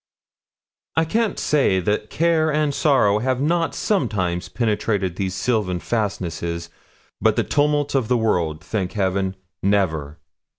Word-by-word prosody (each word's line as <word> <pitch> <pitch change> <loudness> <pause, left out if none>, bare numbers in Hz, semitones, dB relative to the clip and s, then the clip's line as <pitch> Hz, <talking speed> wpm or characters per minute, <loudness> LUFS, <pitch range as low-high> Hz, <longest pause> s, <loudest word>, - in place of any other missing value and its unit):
I 160 - +3
can't 220 +4 0
say 135 -11 +2
that 105 +3 -1
care 160 -1 +2
and 150 -1 +1
sorrow 130 -9 +3
have 130 +2 0
not 165 +4 +1
sometimes 90 - -1
penetrated 105 -5 -1
these 95 -1 -2
sylvan 95 -3 0
fastnesses; 85 -6 -3 0.5
but - - +3
the - - +2
tumults 145 0 +1
of 130 -5 +1
the 125 - +2
world, 85 -8 0
thank 95 -5 -3
Heaven! 95 -2 0 0.3
never.' 80 -7 0
105 Hz, 130 wpm, -22 LUFS, 90-145 Hz, 0.5 s, I